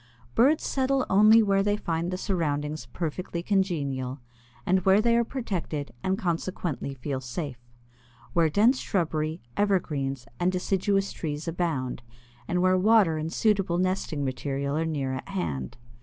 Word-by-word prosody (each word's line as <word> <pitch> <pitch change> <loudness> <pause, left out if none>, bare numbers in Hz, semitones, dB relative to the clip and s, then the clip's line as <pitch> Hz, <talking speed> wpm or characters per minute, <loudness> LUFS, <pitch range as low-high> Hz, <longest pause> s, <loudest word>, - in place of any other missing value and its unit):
Birds 280 +7 +4
settle 270 0 +1
only 215 +3 +7
where 195 -1 +3
they 205 +1 +1
find 170 -3 -2
the 185 - -2
surroundings 150 - -2
perfectly 170 +5 -4
congenial, 145 -10 -1 0.5
and 185 0 +2
where 190 +2 +5
they 235 +2 +3
are 235 - +4
protected 190 - -4
and 190 +5 0
consequently 170 -5 -2
feel 130 +1 -4
safe; 130 0 -5 0.7
where 165 -2 +3
dense 225 - +4
shrubbery, 160 -3 -1
evergreens, 145 -10 0
and 180 +1 +2
deciduous 195 +2 0
trees 150 0 -4
abound, 160 -8 -2 0.5
and 180 0 +1
where 185 0 +4
water 200 -5 +4
and 160 +1 -3
suitable 195 -5 +1
nesting 185 -5 -1
material 140 +2 -2
are 160 +1 0
near 140 -4 -2
at 130 - -6
hand. 70 - -3
170 Hz, 140 wpm, -27 LUFS, 145-195 Hz, 0.7 s, only